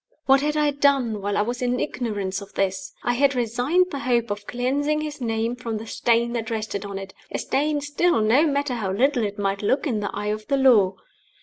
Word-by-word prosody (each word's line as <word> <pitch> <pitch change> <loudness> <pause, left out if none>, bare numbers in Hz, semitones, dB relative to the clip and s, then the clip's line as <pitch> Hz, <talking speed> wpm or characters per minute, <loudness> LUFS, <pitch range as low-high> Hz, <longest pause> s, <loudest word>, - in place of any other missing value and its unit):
What 270 0 +5
had 300 +1 0
I 300 -1 +3
done 275 -7 +2
while 200 +1 -1
I 205 - +3
was 245 +3 -4
in 250 0 0
ignorance 205 -8 -3
of 200 - -12
this? 190 -1 -1
I 245 - +1
had 275 +2 +2
resigned 250 +10 +1
the 280 - -4
hope 240 -4 0
of 205 0 -5
cleansing 285 +5 0
his 300 -2 -6
name 225 0 -1
from 235 -3 -4
the 220 - -7
stain 235 +1 +1
that 230 -2 -3
rested 215 -3 -3
on 200 -1 -5
it 195 0 -8 0.2
a - - -2
stain 295 +1 0
still, 290 +1 +1
no 235 +9 +4
matter 285 -2 0
how 210 -6 -2
little 250 +4 +2
it 205 0 -3
might 200 -1 -1
look 265 +8 +1
in 235 -8 0
the 205 - -2
eye 210 - -3
of 215 0 -7
the 275 - +1
Law. 220 -8 +5
240 Hz, 225 wpm, -24 LUFS, 210-280 Hz, 0.2 s, What